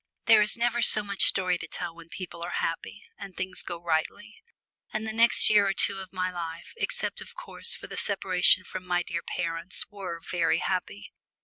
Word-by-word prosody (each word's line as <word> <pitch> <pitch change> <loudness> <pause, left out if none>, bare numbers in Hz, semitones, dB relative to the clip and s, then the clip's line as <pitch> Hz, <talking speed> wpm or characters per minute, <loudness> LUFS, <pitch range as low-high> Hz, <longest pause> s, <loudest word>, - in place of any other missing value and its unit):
There 225 -2 +6
is 210 +2 +2
never 240 0 0
so 215 -2 +7
much 200 -1 0
story 180 -2 +1
to - - -7
tell 170 - -6
when 170 0 -15
people 170 -1 -9
are 170 - -4
happy, - - -6 0.2
and 195 -2 -10
things 185 0 +1
go 175 - -4
rightly; 170 +6 -3 0.5
and 215 0 -4
the 220 - -4
next 230 +1 +4
year 205 -2 +4
or 195 - 0
two 195 - +3
of 190 -1 -10
my 185 -1 -3
life, 165 -1 -7
except - - +1
of - - -11
course - - -1
for - - -10
the - - -9
separation - - +4
from 185 - -8
my 180 -1 -1
dear 170 0 -4
parents, 165 +1 -4
were 190 -4 -7
very 170 0 0
happy. 180 - -4
185 Hz, 200 wpm, -26 LUFS, 170-205 Hz, 0.5 s, so